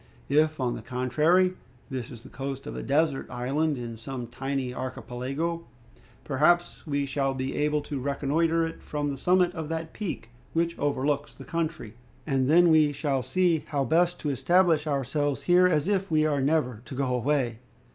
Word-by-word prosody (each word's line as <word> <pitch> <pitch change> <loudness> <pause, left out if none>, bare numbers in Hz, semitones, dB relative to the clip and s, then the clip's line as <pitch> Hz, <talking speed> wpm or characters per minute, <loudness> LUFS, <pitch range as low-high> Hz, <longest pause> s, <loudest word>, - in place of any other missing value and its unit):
If, 155 +2 +3
on 125 -2 0
the - - -6
contrary, 155 +9 +2 0.4
this 125 -3 -4
is 120 -3 -10
the - - -12
coast 135 0 -5
of - - -6
a - - -4
desert 145 0 +1
island 140 +5 -1
in 120 -2 -6
some 125 +1 -5
tiny 130 +1 -3
archipelago, 130 +6 -4 0.6
perhaps 170 +6 +1
we 140 -1 0
shall 135 0 -1
be 130 +1 -3
able 150 0 +1
to 145 -1 -5
reconnoiter 155 +5 +1
it 165 - -7
from 145 -1 -2
the - - -3
summit 180 +5 +2
of 160 -2 -5
that 160 0 -4
peak 180 - -5 0.2
which 170 0 0
overlooks 145 0 -1
the - - -11
country, 160 -9 -3 0.3
and 135 -3 +1
then 175 +2 +6
we 155 -2 +5
shall 140 -2 -1
see 175 +3 +2
how 140 -2 0
best 175 +3 +2
to 150 - -1
establish 165 +2 +3
ourselves 140 0 -1
here 180 +1 +5
as 155 -2 +1
if 195 -1 0
we 155 -1 +3
are 145 -3 +1
never 135 -6 +1
to 135 - -8
go 130 -1 0
away." 125 -2 0
145 Hz, 175 wpm, -27 LUFS, 135-165 Hz, 0.6 s, then